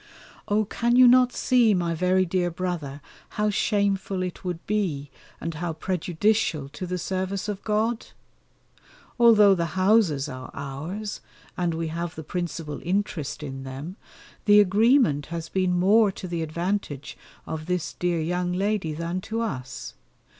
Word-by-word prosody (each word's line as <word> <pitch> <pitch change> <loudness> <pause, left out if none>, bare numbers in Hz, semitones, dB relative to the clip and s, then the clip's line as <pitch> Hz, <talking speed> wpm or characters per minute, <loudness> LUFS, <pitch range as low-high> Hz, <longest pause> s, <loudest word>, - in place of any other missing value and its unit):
Oh! 210 +1 +2
can 235 +3 0
you 255 0 +8
not 250 0 +6
see, 240 -6 +3
my 170 -2 0
very 185 +3 +2
dear 180 0 0
brother, 165 -5 -4 0.4
how 210 0 +2
shameful 195 -2 0
it 180 +1 -6
would 175 -2 -4
be, 165 -10 -1 0.3
and 165 +1 -4
how 165 +2 -3
prejudicial 175 -1 0
to 180 +5 -6
the 180 +1 -2
service 190 +3 -3
of 205 -2 -4
God? 220 +2 0 1.1
Although 215 -4 +7
the 170 -1 -2
houses 185 -8 +3
are 130 -2 -7
ours, 155 +10 -5 0.3
and 175 -2 -1
we 165 0 -2
have 170 +1 -4
the 160 - -7
principal 165 -2 -4
interest 170 -6 -2
in 135 -2 -6
them, 135 +7 -7 0.5
the 205 0 +7
agreement 205 - +4
has 165 -1 -5
been 185 -2 +1
more 205 +3 +5
to 185 - -7
the 170 -1 -3
advantage 165 -2 -3 0.3
of 155 0 -5
this 180 -2 -2
dear 175 -1 -1
young 180 +2 -1
lady 195 -3 0
than 170 +4 -3
to 225 +4 -3
us. 130 - -5
180 Hz, 150 wpm, -25 LUFS, 160-205 Hz, 1.1 s, you